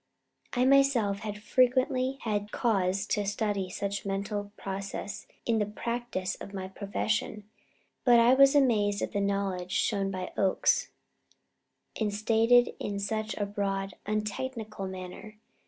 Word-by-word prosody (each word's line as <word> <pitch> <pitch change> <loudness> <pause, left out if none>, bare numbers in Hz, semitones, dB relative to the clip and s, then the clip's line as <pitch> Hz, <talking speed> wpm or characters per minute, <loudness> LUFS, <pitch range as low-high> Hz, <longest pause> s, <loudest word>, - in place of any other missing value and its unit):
I 250 0 +2
myself 260 -7 +4
had 210 -1 -6
frequently 255 +2 +2
had 210 -2 -2
cause 195 -4 +1
to 210 0 0
study 205 -2 -1
such 200 +2 -3
mental 200 +1 -3
processes 195 +1 -5 0.2
in 230 -2 +2
the 210 - +2
practice 235 -3 -3
of 200 - -8
my 190 -1 -5
profession, 210 +2 -2 0.6
but 240 -2 +6
I 235 +2 +6
was 275 +2 +6
amazed 210 -7 +3
at - - -3
the 200 - -1
knowledge 195 -2 -1
shown 200 -3 +1
by 185 -1 -5
Oakes, 190 -1 +2 1.1
and 215 -2 +1
stated 225 +3 +4
in 200 - -3
such 215 +2 -2
a 205 - 0
broad, 195 -1 -2
untechnical 215 0 -3
manner. 185 +3 -8
205 Hz, 135 wpm, -29 LUFS, 195-230 Hz, 1.1 s, but